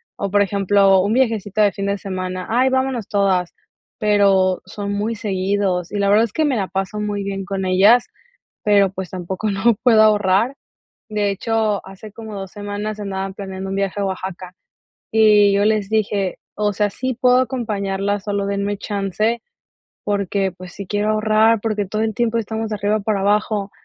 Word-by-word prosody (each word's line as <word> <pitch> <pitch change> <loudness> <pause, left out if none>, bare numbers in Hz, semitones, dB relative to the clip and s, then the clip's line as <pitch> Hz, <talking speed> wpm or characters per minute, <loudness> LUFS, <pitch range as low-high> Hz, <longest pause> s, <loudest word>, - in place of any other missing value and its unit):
O, 200 - -3
por 205 +1 +3
ejemplo, 195 -1 +3
un 200 +3 0
viajecito 225 -5 0
de 205 -1 +4
fin 200 0 -4
de 200 0 0
semana, 185 -2 -4
ay, 255 +3 +3
vámonos 260 -4 -1
todas, 190 -4 0 0.4
pero 195 -3 +3
son 200 +1 -5
muy 210 +3 -2
seguidos 195 -4 -1
y 210 - -3
la 200 0 +1
verdad 215 +3 +5
es 220 - -10
que 315 - +1
me 280 -3 +1
la 200 -4 -1
paso 195 +2 -3
muy 205 -1 -2
bien 195 -1 -4
con 195 -1 -3
ellas, 200 +6 +5 0.6
pero, 200 -2 +4
pues, 190 -2 -6
tampoco 185 +3 -4
no 220 +4 +3
puedo 225 -3 +5
ahorrar. 210 +3 +3 0.5
De 210 -1 0
hecho, 215 0 0
hace 195 +3 -11
como 220 0 -9
2 195 -2 -6
semanas 205 +1 -5
andaban 195 -1 -4
planeando 190 -1 -6
un 195 - -2
viaje 195 0 -1
a - - 0
Oaxaca 185 -1 -5 0.6
y 210 -2 +5
yo 200 +1 +2
les 215 -2 +1
dije, 205 -3 0 0.2
o 210 -1 0
sea, 205 +1 +1
sí 260 +5 -3
puedo 250 -1 +4
acompañarlas, 205 -5 -2
solo 200 -1 -1
denme 200 +1 -1
chance, 205 +3 -1 0.6
porque, 200 -1 -1
pues, 180 0 -12
sí 200 - -7
quiero 205 +3 0
ahorrar, 215 +1 +3
porque 215 -2 -1
todo 215 +3 -3
el 220 0 0
tiempo 230 0 0
estamos 220 0 -3
de - - -1
arriba 210 +1 0
para 205 -1 -1
abajo, 205 0 0
205 Hz, 180 wpm, -20 LUFS, 195-215 Hz, 0.6 s, verdad